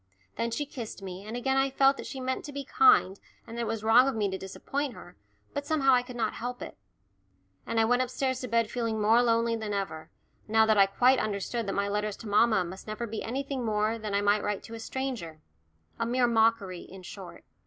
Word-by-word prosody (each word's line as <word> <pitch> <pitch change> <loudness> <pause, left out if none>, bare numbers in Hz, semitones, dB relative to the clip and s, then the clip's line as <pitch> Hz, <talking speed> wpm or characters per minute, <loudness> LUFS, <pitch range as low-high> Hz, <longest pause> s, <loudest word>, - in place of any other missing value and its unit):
Then 230 - -1
she 260 +6 -2
kissed 235 -7 -8
me, 190 0 -7
and 225 +3 -4
again 265 +2 0
I 270 0 +3
felt 270 +1 +4
that - - -7
she 265 - -6
meant 260 0 -2
to 290 - -7
be 280 0 -5
kind 425 - +4 0.3
and 230 - -9
that 235 - -3
it 230 - -2
was 220 -1 -3
wrong 235 +4 +6
of 270 - -1
me 205 -3 0
to 190 - -3
disappoint 270 +8 -4
her, - - -13 0.4
but 285 - -2
somehow 275 -4 +3
I 250 - +5
could 250 0 -10
not 225 -3 -1
help 245 +2 -5
it. - - -9 0.9
And 230 0 0
I 225 - +4
went 245 +2 +3
upstairs 255 +1 -1
to 255 - -4
bed 230 -1 +1
feeling 230 -3 -2
more 220 +3 +4
lonely 230 -1 +2
than 215 -2 -3
ever, 160 -6 -4 0.4
now 220 0 +4
that 220 0 +3
I 195 - +7
quite 250 +6 +3
understood 215 +2 -2
that 195 - -2
my 200 0 0
letters 210 0 -2
to 225 - -9
mamma 210 -2 +3
must 190 +4 -9
never 215 +2 -4
be 225 -1 -5
anything 270 +2 -3
more 215 0 0
than 210 -2 -3
I 200 - +2
might 205 +1 +3
write 205 -1 -2
to 230 - -10
a 230 - -6
stranger 225 -11 -5 0.6
a 230 - 0
mere 245 +1 +2
mockery, 225 -6 +2
in 190 0 -12
short. - - -10
230 Hz, 235 wpm, -28 LUFS, 210-255 Hz, 0.9 s, I